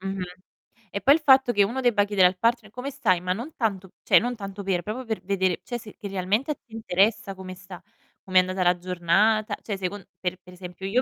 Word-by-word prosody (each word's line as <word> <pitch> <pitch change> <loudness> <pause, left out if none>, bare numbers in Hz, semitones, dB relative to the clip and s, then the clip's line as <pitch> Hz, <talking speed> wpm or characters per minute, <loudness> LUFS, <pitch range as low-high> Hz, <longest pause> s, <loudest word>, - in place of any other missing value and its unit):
Mh-mh. 195 -1 -3 0.7
E, 200 - -4
poi 280 +3 +6
il - - 0
fatto 265 -3 +6
che 205 -3 +4
uno 240 +7 -2
debba 220 -5 +3
chiedere 195 -3 +5
al 185 0 -3
partner: 230 -1 0
"Come 250 +4 -5
stai?" 185 -8 +1
Ma 180 0 0
non 245 +10 -7
tanto 195 -5 -2
cioè - - +6
non 245 +2 -2
tanto 200 -2 -7
per, 185 -2 0
proprio 220 +8 -5
per 220 -5 -4
vedere, 190 -2 0
cioè 240 - -4
se 215 -2 -12
che 205 - -7
realmente 200 +9 -1
a - - +1
te - - -44
interessa 210 -2 0
come 185 -1 -8
sta, 185 -1 -11 0.4
come 185 -2 +1
è - - +11
andata 185 0 0
la 180 0 +3
giornata. 185 +5 +1
Cioè 205 -3 -4
second 190 0 -5
per 180 0 -2
per 180 -1 -15
esempio 180 +1 -9
io 245 +6 +2
195 Hz, 235 wpm, -25 LUFS, 185-225 Hz, 0.7 s, è